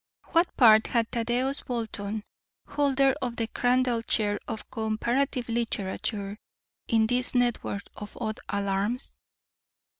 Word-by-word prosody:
What 340 +1 +4
part 220 -3 +7
had 230 -2 0
Thaddeus 245 +4 0
Bolton, 220 -3 -4 0.4
holder 275 -2 +2
of 245 -2 -2
the 230 - -1
Crandall 245 +1 +1
Chair 210 -2 +1
of 225 -2 -5
Comparative 235 +4 0
Literature, 210 -2 -2 0.5
in 225 -1 +3
this 250 +3 +1
network 240 -4 0
of 210 0 -9
odd 215 0 -3
alarms? 200 +5 -1
230 Hz, 115 wpm, -27 LUFS, 215-250 Hz, 0.5 s, part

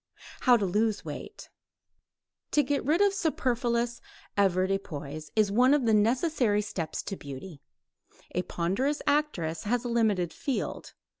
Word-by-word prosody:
HOW 245 -1 +5
TO 205 - 0
LOSE 210 +3 0
WEIGHT - - -8 1.0
To 295 - +3
get 280 +1 -1
rid 315 +8 +2
of 405 -1 +4
superfluous 245 - 0 0.3
avoirdupois 185 -6 -1
is 215 -2 +3
one 250 +6 +5
of 280 -4 0
the 225 - +3
necessary 230 0 +2
steps 175 -6 -4
to 195 - -4
beauty. 140 +1 -9 0.7
A 180 - +1
ponderous 195 - -1
actress 200 - 0
has 245 +3 0
a - - -1
limited 210 -7 +1
field. 275 - -4
220 Hz, 135 wpm, -28 LUFS, 185-260 Hz, 1.0 s, HOW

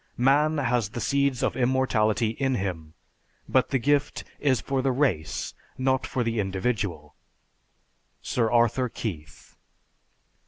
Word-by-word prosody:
Man 145 +5 +3
has 120 -6 0
the 115 - -6
seeds 140 0 +1
of - - 0
immortality 120 -4 +1
in 130 +3 -1
him, 85 -7 -4 0.5
but 130 - +2
the 135 - +2
gift 145 +3 0 0.2
is 130 -4 +2
for 135 -1 -1
the 135 0 +1
race, 125 - -1 0.2
not 130 0 +1
for 125 - -1
the 115 -1 -1
individual._ 95 -6 -2 1.1
SIR 115 -2 0
ARTHUR 120 +2 +2
KEITH. 80 -10 -7
120 Hz, 125 wpm, -26 LUFS, 105-130 Hz, 1.1 s, Man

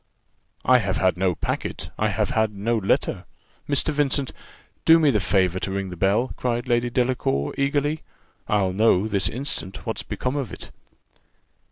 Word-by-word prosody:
"I 130 0 +6
have 100 -4 -1
had 95 -1 +2
no 90 -1 +1
packet - - -4
I - - +2
have - - -1
had 110 -1 +1
no 110 +4 0
letter. 100 -3 0 0.4
Mr. 145 +2 +3
Vincent, 140 -2 0 0.5
do 165 0 +7
me 155 -3 +4
the 105 - +2
favour 95 -2 +1
to 95 - -3
ring 95 -1 -3
the - - -6
bell," 100 +8 +1
cried 120 0 -1
Lady 120 0 +1
Delacour, 120 - 0
eagerly: 145 +2 0 0.5
"I'll 100 -3 +1
know, 105 -1 +3
this 100 -3 +1
instant, 115 - -4
what's - - -3
become 125 +2 -3
of 140 -5 -3
it." - - -9
110 Hz, 165 wpm, -24 LUFS, 95-130 Hz, 0.5 s, do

